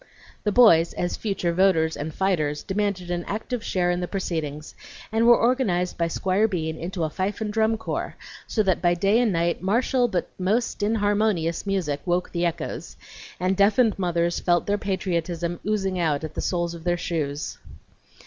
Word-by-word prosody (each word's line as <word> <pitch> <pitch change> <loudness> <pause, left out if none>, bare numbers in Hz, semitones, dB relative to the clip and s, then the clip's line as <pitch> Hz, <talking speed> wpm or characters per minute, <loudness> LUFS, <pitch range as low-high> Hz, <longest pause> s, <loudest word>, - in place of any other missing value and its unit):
The 210 - +2
boys, 175 -8 +6
as 175 - -2
future 195 -5 -1
voters 170 -3 +3
and 150 +2 -4
fighters, 155 -5 0
demanded 195 -3 -2
an 175 0 -1
active 225 +3 -4
share 180 -5 +1
in 175 - -1
the 180 - -2
proceedings, 160 -6 -4 0.4
and 225 +1 +2
were 240 -1 +8
organized 210 -8 +1
by 170 - 0
Squire 190 +5 +1
Bean 160 -6 -2
into 175 +1 -4
a 155 - 0
fife 195 +4 -2
and 215 -2 -3
drum 220 0 +2
corps, - - -4 0.3
so 215 - +1
that 190 -3 +1
by 175 -1 +3
day 195 +6 +3
and 240 -3 +2
night 170 -1 0
martial 245 +6 +2
but 185 -6 -2
most 210 +5 0
inharmonious 205 -5 +1
music 175 -8 -1
woke 180 +1 0
the 175 0 +1
echoes, 170 - -5 0.4
and 185 +1 +1
deafened 210 +2 +3
mothers 170 -2 0
felt 175 -1 +2
their 205 0 0
patriotism 175 -3 -2
oozing 195 -3 0
out 155 -3 0
at 155 -1 -5
the - - -3
soles 175 -2 -1
of 170 -1 -9
their 175 0 +1
shoes. 150 -4 -3
185 Hz, 175 wpm, -24 LUFS, 170-205 Hz, 0.4 s, were